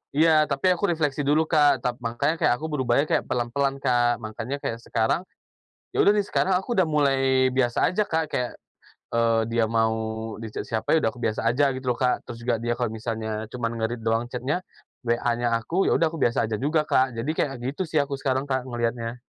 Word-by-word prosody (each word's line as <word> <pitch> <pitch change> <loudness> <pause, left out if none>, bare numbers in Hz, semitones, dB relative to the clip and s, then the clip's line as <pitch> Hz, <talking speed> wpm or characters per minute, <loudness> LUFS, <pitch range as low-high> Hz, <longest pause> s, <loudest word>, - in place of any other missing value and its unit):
Iya, 155 0 +5
tapi 140 +3 -1
aku 190 +1 0
refleksi 150 -3 -1
dulu, 155 +3 +2
Kak. 145 -5 +4
Tap 125 +1 -2
mangkanya 130 +7 0
kayak 160 - +2
aku 160 - -4
berubahnya 140 -2 +1
kayak - - +1
pelan-pelan, 135 +3 0
Kak. 120 -2 +2
Mangkanya 110 +5 -5
kayak 115 -3 -4
sekarang, 115 +11 0 0.7
ya - - +4
udah - - +6
nih, 205 -1 +2
sekarang 185 -2 +2
aku 235 +6 -3
udah 190 - +4
mulai 135 -4 +2
biasa 120 -2 +2
aja, 200 +4 +1
Kak, 160 -5 -1
kayak, 125 -4 -2 0.6
eee, 115 -1 +2
dia 115 -1 +2
mau 110 0 +1 0.4
di-chat 110 -1 -5
siapa, 110 +4 -1
ya 160 - +4
udah - - +2
aku 115 - -12
biasa 110 - -1
aja 140 +4 +2
gitu 130 0 -7
loh, 120 - 0
Kak. 125 -1 +1
Terus 120 - -6
juga 120 -2 +2
dia 120 0 -1
kalau 120 -3 -1
misalnya 110 -1 -4
cuman 120 -2 -3
nge-read 115 +1 -3
doang 115 +1 +2
chat-nya, 130 +9 -2 0.4
WA-nya 120 0 0
aku, 170 +12 0
ya - - +3
udah 165 - +3
aku 160 - -6
biasa 115 -1 +2
aja 110 -1 -2
juga, 150 +2 +1
Kak. 130 -4 +1
Jadi 135 +7 -1
kayak 135 -4 -1
gitu 140 +8 -3
sih 155 - 0
aku 140 -1 +1
sekarang, 135 0 -1
Kak, 130 -2 -1
ngeliatnya. 120 0 -2
125 Hz, 210 wpm, -25 LUFS, 115-150 Hz, 0.7 s, udah